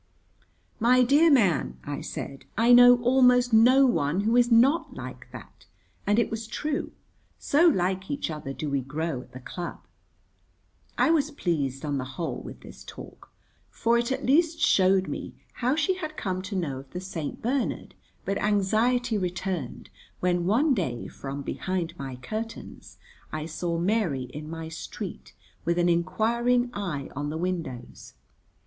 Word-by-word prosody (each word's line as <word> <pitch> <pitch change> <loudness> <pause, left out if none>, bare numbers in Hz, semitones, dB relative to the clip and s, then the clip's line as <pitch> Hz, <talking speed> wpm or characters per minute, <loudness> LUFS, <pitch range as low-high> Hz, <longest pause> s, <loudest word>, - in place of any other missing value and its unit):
"My 250 +2 +5
dear 290 +7 +5
man," 205 - +2
I 145 0 -5
said, 135 0 -7
"I 235 +2 +5
know 245 0 +8
almost 250 -1 +4
no 255 +5 +6
one 180 - +1
who 225 +3 +1
is 245 -1 +4
not 260 +8 +4
like - - -8
that," - - -13 0.4
and 205 +1 +3
it 235 - +2
was 225 0 -4
true, 295 +5 -3 0.5
so 325 +5 +3
like 190 - +1
each 280 - -2
other 150 -3 -6
do 150 +2 -5
we 140 -1 0
grow 150 +1 -3
at - - -17
the 130 - -8
club. 175 +7 -7 1.1
I - - +4
was 305 -3 +2
pleased, 155 - -2
on 145 -2 -1
the 130 0 -6
whole, 170 - -3
with - - -10
this - - -12
talk, - - -12 0.4
for 230 +1 +1
it 235 +1 +1
at 265 - -2
least 325 +4 +3
showed 190 0 +3
me - - -6 0.2
how 255 +3 0
she 375 +4 +1
had 310 -4 -6
come 185 -2 -2
to 195 +2 -6
know 150 -8 -2
of 135 0 -13
the 180 - -3
St. 175 -5 -5
Bernard, 255 +3 -2 0.3
but 195 +1 -1
anxiety 215 +3 +1
returned 180 -6 -4 0.3
when 180 -1 0
one 270 +9 +3
day 145 - -2
from 140 +1 -7
behind 170 +6 -3
my 135 -2 -6
curtains 220 - -7 0.3
I 155 0 -4
saw 170 +1 -3
Mary 175 - 0
in 150 +1 -7
my 165 0 -6
street 160 0 -8 0.3
with 170 0 0
an 175 0 +3
inquiring 235 +8 +1
eye 165 -9 -4
on 145 +1 -3
the 155 - -4
windows. 160 -9 -5
190 Hz, 160 wpm, -26 LUFS, 160-245 Hz, 1.1 s, know